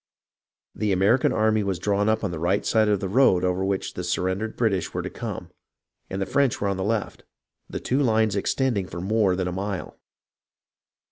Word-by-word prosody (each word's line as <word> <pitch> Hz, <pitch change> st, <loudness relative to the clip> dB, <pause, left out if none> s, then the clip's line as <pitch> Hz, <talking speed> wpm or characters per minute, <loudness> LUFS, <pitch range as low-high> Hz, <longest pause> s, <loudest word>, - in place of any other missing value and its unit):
The 105 Hz, -2 st, -1 dB
Ameri 105 Hz, +8 st, +3 dB
can -, -, +3 dB
army 110 Hz, 0 st, +2 dB
was 100 Hz, -3 st, -1 dB
drawn 100 Hz, +3 st, +1 dB
up 110 Hz, 0 st, +1 dB
on 100 Hz, -, -1 dB
the 85 Hz, -, -5 dB
right 90 Hz, +5 st, 0 dB
side 110 Hz, -1 st, +3 dB
of 105 Hz, -2 st, +2 dB
the 95 Hz, -, -2 dB
road 95 Hz, -4 st, +4 dB
over 90 Hz, +1 st, 0 dB
which 95 Hz, 0 st, -2 dB
the 90 Hz, -, -5 dB
surrendered 95 Hz, +5 st, -2 dB
British 100 Hz, -7 st, 0 dB
were -, -, -1 dB
to -, -, -5 dB
come, -, -, -6 dB, 0.6 s
and 95 Hz, -, -4 dB
the 95 Hz, -, 0 dB
French 140 Hz, +1 st, +1 dB
were 100 Hz, -, 0 dB
on 100 Hz, -, -1 dB
the 95 Hz, -, -2 dB
left, 105 Hz, +1 st, -2 dB, 0.5 s
the -, -, -4 dB
two 130 Hz, -, 0 dB
lines 110 Hz, -5 st, +2 dB
extending 105 Hz, -1 st, 0 dB
for 85 Hz, +1 st, -7 dB
more 100 Hz, 0 st, +2 dB
than 90 Hz, -1 st, -1 dB
a -, -, -2 dB
mile. 95 Hz, +1 st, -4 dB
100 Hz, 205 wpm, -25 LUFS, 95-110 Hz, 0.6 s, road